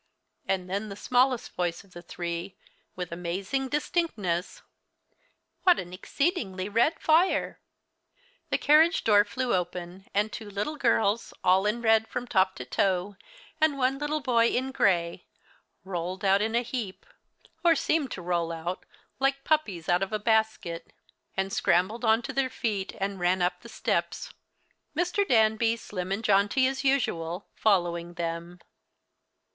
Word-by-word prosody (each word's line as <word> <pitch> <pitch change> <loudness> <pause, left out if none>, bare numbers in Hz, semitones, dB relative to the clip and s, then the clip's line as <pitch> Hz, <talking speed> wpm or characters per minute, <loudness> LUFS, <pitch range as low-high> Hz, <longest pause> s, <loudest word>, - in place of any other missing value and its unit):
And 185 -1 -1
then 200 +3 -3
the 200 - -6
smallest 250 +3 +1
voice 175 -1 -2
of 195 - -24
the 175 - -10
three 170 +1 -5 0.4
with 180 -2 -5
amazing 190 +10 -2
distinctness: 225 - -1 1.0
"What 360 -2 +5
an 175 0 -6
exceedingly 200 - -2
red 235 +10 +2
fire." 330 +4 +2 0.9
The - - +2
carriage 320 +3 +4
door 205 -2 +5
flew 250 +4 -2
open, 180 +1 -3
and 210 +2 0
two 220 -3 -7
little 205 +10 -3
girls 230 -5 +1
all 190 +2 +4
in 235 +3 -1
red 220 0 +4
from 245 - -4
top 190 -5 +2
to 125 - -7
toe, 190 +7 0 0.5
and 310 -3 +3
one 265 +1 +1
little 300 +1 -1
boy 235 -3 +3
in 260 +3 -1
gray, 175 -7 +1 0.6
rolled 185 +1 -4
out 195 +1 +4
in 220 +2 0
a 240 - +2
heap, 230 -6 -5 0.6
or 335 -1 +5
seemed 310 -3 0
to 180 - -7
roll 170 -1 -1
out, 170 +3 -5 0.3
like 275 0 +1
puppies 210 - 0
out 175 +1 +3
of 195 - -2
a 215 - 0
basket, 220 -6 0 0.6
scrambled 195 +5 +1
on 225 +1 +3
to 265 - -5
their 270 0 +1
feet 205 -6 -3
and 195 0 -2
ran 180 +1 +2
up 180 0 0
the 235 - -12
steps, - - -2 0.6
Mr. 360 +3 +1
Danby, 225 0 +3
slim 185 -4 -6
and 200 +3 -2
jaunty 205 +5 +3
as 270 +1 -1
usual, 185 -10 0
following 175 -4 +1
them. 170 0 -4
205 Hz, 150 wpm, -27 LUFS, 180-255 Hz, 1.0 s, What